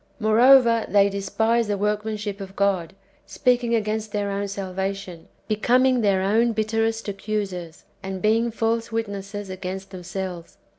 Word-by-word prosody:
Moreover, 230 +1 +5
they 200 -1 +4
despise 220 +4 0
the 205 -1 -1
workmanship 210 0 -2
of 195 0 -8
God, 195 -4 0 0.3
speaking 245 -3 +1
against 215 -1 -2
their 205 -1 -1
own 200 +1 -2
salvation, 190 -2 -5 0.2
becoming 250 +4 +3
their 195 -3 +2
own 225 +4 +2
bitterest 225 +1 -1
accusers, 195 -5 -4 0.2
and 190 0 -5
being 225 +3 +2
false 230 0 -1
wit 225 0 0
nesses 200 0 -6
[against 190 +1 -6
themselves]. 180 -1 -6
205 Hz, 135 wpm, -23 LUFS, 195-225 Hz, 0.3 s, Moreover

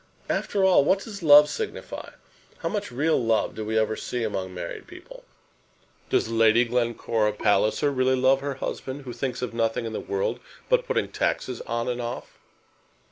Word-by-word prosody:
After 200 -2 0
all, 185 -6 +5
what 190 +7 +2
does 205 -3 -8
love 150 -2 +8
signify? 440 - -6 0.4
How - - -3
much 205 - -3
real 145 +1 +1
love 115 -1 +1
do 110 - -5
we 110 +1 -1
ever 110 0 +1
see 120 +1 -4
among 95 -4 -3
married 90 -2 -7
people? - - -13 0.8
Does - - +2
Lady 115 +1 +4
Glencora 115 -2 0
Palliser 105 +7 +2
really 130 -1 +2
love 130 +1 +3
her 140 -1 -3
husband, 135 +1 -5
who 125 -2 -7
thinks 125 +1 -3
of 125 - -3
nothing 115 0 0
in 110 - -5
the - - -3
world 435 +5 -2 0.3
but - - +2
putting - - 0
taxes 125 -2 -2
on 115 0 -2
and 125 -1 -2
off?" 120 +1 -6
125 Hz, 175 wpm, -25 LUFS, 115-145 Hz, 0.8 s, love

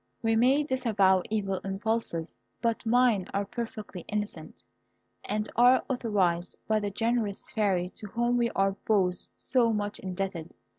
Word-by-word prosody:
We 225 0 +2
may 260 +6 +4
disavow 215 -9 +2
evil 195 -3 -1
impulses; 195 -4 -2 0.2
but 230 -1 -1
mine 230 -5 +3
are 200 0 0
perfectly 220 -4 -6
innocent, 210 0 -5 0.6
and 210 +1 -1
are 245 +2 +6
authorised 190 -8 0
by 215 0 +2
the 205 -1 -2
generous 225 -1 -1
Fairy 190 -5 +1
to 210 - -7
whom 240 +4 0
we 240 -1 +2
are 195 0 +3 0.2
both 185 -4 +2
so 240 -3 +2
much 205 -1 -2
indebted. 185 -3 -4
210 Hz, 140 wpm, -28 LUFS, 195-235 Hz, 0.6 s, are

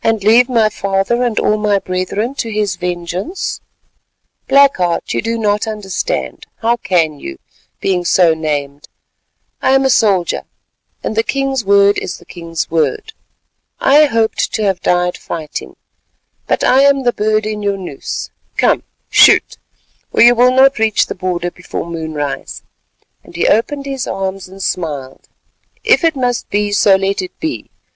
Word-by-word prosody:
"And 225 -3 +1
leave 235 +4 +5
my 225 -3 +3
father 195 +4 -1
and 240 -3 -1
all 215 - +1
my 210 -1 +1
brethren 195 +6 -3
to 235 -4 -4
his 210 -3 -1
vengeance? 180 - -4 0.9
Black 280 0 +5
Heart, 175 -2 -1
you - - 0
do 230 +1 -2
not 210 0 0
understand. 215 - -4
How 235 +1 +1
can 165 -8 0
you, 70 - -8 0.4
being 185 -2 0
so 175 -1 +4
named? 145 -2 -4 0.7
I 265 - +3
am 270 0 +3
a 265 - +3
soldier, 195 -7 +1 0.6
and - - -3
the 225 - +3
king's 270 +1 -1
word 200 0 +4
is 185 - -5
the - - -18
king's 165 -3 -5
word. 160 - -1 0.7
I 295 +3 +5
hoped 225 -4 0
to 220 - -1
have 195 -3 0
died 180 0 +1
fighting, 155 -3 -6 0.7
but - - 0
I 260 +2 +4
am 280 -1 +3
the 245 -1 +2
bird 215 0 0
in 215 -1 -3
your 200 -1 -1
noose. 175 -8 -6 0.3
Come, - - +2 0.3
shoot, - - +5 0.5
or - - +4
you 240 +1 +8
will 245 +1 +4
not 265 0 +4
reach 220 -1 +2
the - - -5
border 175 -2 -3
before 175 - -6
moonrise," 160 -4 -5 0.6
and - - -16
he - - +1
opened 275 +6 +1
his 270 -2 -4
arms 195 -1 -4
and 195 0 -9
smiled. 145 -8 -4 0.6
"If 460 -5 +3
it 325 -2 +2
must 245 -2 -2
be, 205 0 0
so 205 -1 +4
let 195 +1 -1
it 185 - -9
be. 315 0 -4
205 Hz, 160 wpm, -16 LUFS, 180-240 Hz, 0.9 s, you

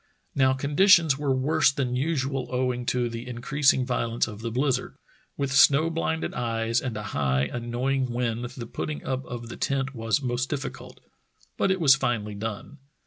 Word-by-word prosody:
Now 130 -1 +3
conditions 145 +2 +4
were 145 -2 0
worse 145 +5 +3
than 130 -3 -2
usual 135 -2 -1
owing 125 -1 -1
to 125 -1 +1
the 115 +1 -6
increas 130 +4 +2
ing 130 - -1
violence 120 -2 0
of 105 -1 -9
the 115 - -3
blizzard. 125 +1 -1 0.4
With 140 -1 -1
snow 145 +4 +5
blinded 160 0 -2
eyes 115 -1 -1
and 120 -5 -4
a 105 - -5
high, 65 -2 +1
annoying 120 - -2
wind 120 -1 -2
the 125 -1 -7
putting 150 +5 -5
up 130 0 -2
of 120 -1 -7
the - - -8
tent 135 0 -1
was 115 -1 0
most 125 -1 -2
difficult, 140 -3 -6 0.5
but - - +1
it 190 0 +1
was 145 -5 +7
finally 110 -6 -1
done. 110 +7 -6
125 Hz, 175 wpm, -26 LUFS, 120-140 Hz, 0.5 s, was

